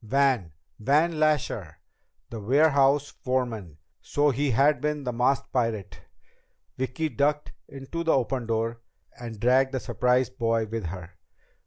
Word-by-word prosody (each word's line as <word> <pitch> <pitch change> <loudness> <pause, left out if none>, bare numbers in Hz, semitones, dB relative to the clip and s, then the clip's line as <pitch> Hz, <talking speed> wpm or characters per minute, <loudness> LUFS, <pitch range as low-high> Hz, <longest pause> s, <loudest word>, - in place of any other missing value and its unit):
Van! 130 - +1 0.3
Van 155 +7 +2
Lasher! 130 - 0 0.5
The 115 - -5
warehouse 140 +4 +3
foreman! 115 - -3 0.2
So 145 0 +1
he 140 +3 0
had 140 +5 +3
been 150 -1 -1
the 125 -2 -3
masked 125 +3 +1
pirate! 115 -6 -2 0.7
Vicki 130 +5 -2
ducked 145 0 0 0.2
into 140 +5 -6
the 165 - +3
open 125 -1 0
door, 115 +1 -1 0.4
and 115 -3 -7
dragged 130 +4 +3
the 130 - 0
surprised 125 -3 0
boy 115 -1 +1
with 110 -3 -4
her. 90 0 -8
130 Hz, 135 wpm, -26 LUFS, 115-140 Hz, 0.7 s, warehouse